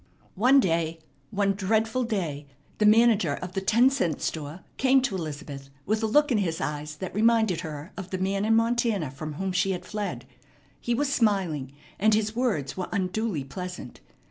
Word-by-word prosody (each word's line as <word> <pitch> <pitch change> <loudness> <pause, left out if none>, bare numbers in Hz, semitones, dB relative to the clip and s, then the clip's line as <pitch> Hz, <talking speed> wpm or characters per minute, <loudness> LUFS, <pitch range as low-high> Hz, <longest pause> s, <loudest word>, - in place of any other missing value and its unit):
One 255 +8 +5
day, 165 -6 0 0.3
one 200 0 +1
dreadful 220 +5 0
day, 165 -10 -3 0.3
the 210 - +4
manager 215 -8 +4
of 180 - -7
the 195 - -1
ten 230 +7 +4
cent 175 - 0
store 155 +2 -4 0.2
came 265 +1 +4
to 265 - -1
Elizabeth 145 -5 -6 0.2
with 215 +2 0
a 220 - +1
look 295 +6 +3
in 225 - +3
his 165 -5 -1
eyes 150 0 -4
that 185 +4 -6
reminded 220 -3 +3
her 155 +2 -7
of 190 -2 -7
the 185 - -3
man 195 +2 -1
in 225 +1 +3
Montana 230 - +1
from 150 +3 -6
whom 190 +5 -3
she 190 +1 +1
had 180 0 -6
fled. 195 - -4 0.5
He 240 - -1
was 280 +2 0
smiling, 180 - 0 0.3
and 215 +1 +4
his 215 0 -1
words 210 - -1
were 185 -1 -4
unduly 200 -4 -1
pleasant. 180 -1 -7
195 Hz, 180 wpm, -26 LUFS, 160-220 Hz, 0.5 s, One